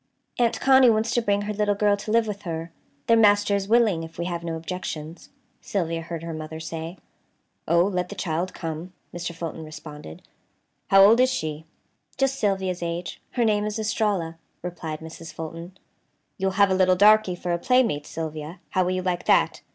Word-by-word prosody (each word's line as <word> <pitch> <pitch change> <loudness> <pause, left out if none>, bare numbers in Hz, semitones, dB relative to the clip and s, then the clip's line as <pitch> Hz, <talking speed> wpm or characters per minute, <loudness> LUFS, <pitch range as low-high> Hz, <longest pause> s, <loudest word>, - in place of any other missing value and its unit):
"Aunt 235 -1 +2
Connie 265 -2 +6
wants 225 +1 +1
to 240 - +2
bring 205 -2 +1
her 210 +1 -3
little 205 0 +1
girl 205 0 +3
to 205 - -8
live 230 +1 +3
with 205 -2 -5
her. 165 -3 -5 0.3
Their 230 - +5
master 205 -2 +4
is 195 -1 -2
willing, 220 -6 +3
if 165 0 -9
we 170 - -2
have 170 -1 -3
no 165 -1 -3
objections," 165 -1 -6 0.3
Sylvia 165 -4 -2
heard 165 0 -6
her 165 -1 -5
mother 155 0 -6
say. 160 +2 -6 0.7
"Oh, 170 +1 +4
let 180 -2 -1
the 205 - -7
child 175 0 -2
come," 165 +1 -6 0.2
Mr. 175 0 -5
Fulton 165 -1 -5
responded; 150 - -10 0.6
"how 195 0 +7
old 220 +4 +7
is 255 0 +5
she?" 155 -7 -3 0.5
"Just 270 0 +1
Sylvia's 190 -3 0
age. 170 +1 -4
Her 240 -2 +1
name 210 -1 +2
is 210 0 -3
Estralla," 205 -6 -1 0.2
replied 165 -3 -5
Mrs. 160 0 -9
Fulton. 165 +3 -8 0.6
"You'll 190 0 -1
have 200 -1 +5
a - - +3
little 185 -1 +4
darky 210 -1 +5
for 175 0 -4
a 170 - -1
playmate, 230 - +2
Sylvia. 155 +1 -6
How 185 - +2
will 180 +1 0
you 185 0 -2
like 180 -1 -2
that?" - - +3
180 Hz, 190 wpm, -25 LUFS, 165-205 Hz, 0.7 s, how